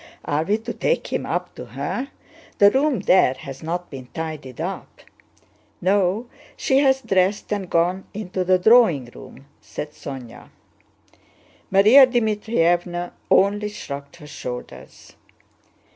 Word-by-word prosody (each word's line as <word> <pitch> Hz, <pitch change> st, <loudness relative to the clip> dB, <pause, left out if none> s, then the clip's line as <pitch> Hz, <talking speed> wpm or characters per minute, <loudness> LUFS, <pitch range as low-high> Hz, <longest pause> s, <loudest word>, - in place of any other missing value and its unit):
Are 145 Hz, +2 st, 0 dB
we 205 Hz, +6 st, +1 dB
to 225 Hz, -, -6 dB
take -, -, -1 dB
him -, -, -2 dB
up -, -, -3 dB
to -, -, -8 dB
her? 265 Hz, -, -4 dB, 0.5 s
The 200 Hz, 0 st, +6 dB
room 270 Hz, -5 st, +1 dB
there 185 Hz, -9 st, +4 dB
has 135 Hz, -1 st, -9 dB
not 175 Hz, +2 st, -4 dB
been 130 Hz, -3 st, -9 dB
tidied 155 Hz, -6 st, -6 dB
up." -, -, -6 dB, 0.8 s
"No, 195 Hz, +4 st, +1 dB, 0.3 s
she 265 Hz, 0 st, +2 dB
has 265 Hz, -1 st, +3 dB
dressed 195 Hz, +2 st, +1 dB
and 195 Hz, -3 st, -4 dB
gone 180 Hz, +3 st, +1 dB
into 190 Hz, -3 st, -4 dB
the 185 Hz, +1 st, +3 dB
drawing 180 Hz, -, +4 dB
room," 135 Hz, +1 st, -13 dB, 0.2 s
said 150 Hz, -, -7 dB
Sónya. 130 Hz, -6 st, -9 dB, 1.2 s
Márya 230 Hz, +7 st, +7 dB
Dmítrievna 175 Hz, -6 st, 0 dB, 0.2 s
only 205 Hz, +2 st, +3 dB
shrugged 140 Hz, -7 st, -8 dB
her 165 Hz, -3 st, -13 dB
shoulders. 125 Hz, -4 st, -9 dB
185 Hz, 130 wpm, -22 LUFS, 155-215 Hz, 1.2 s, Márya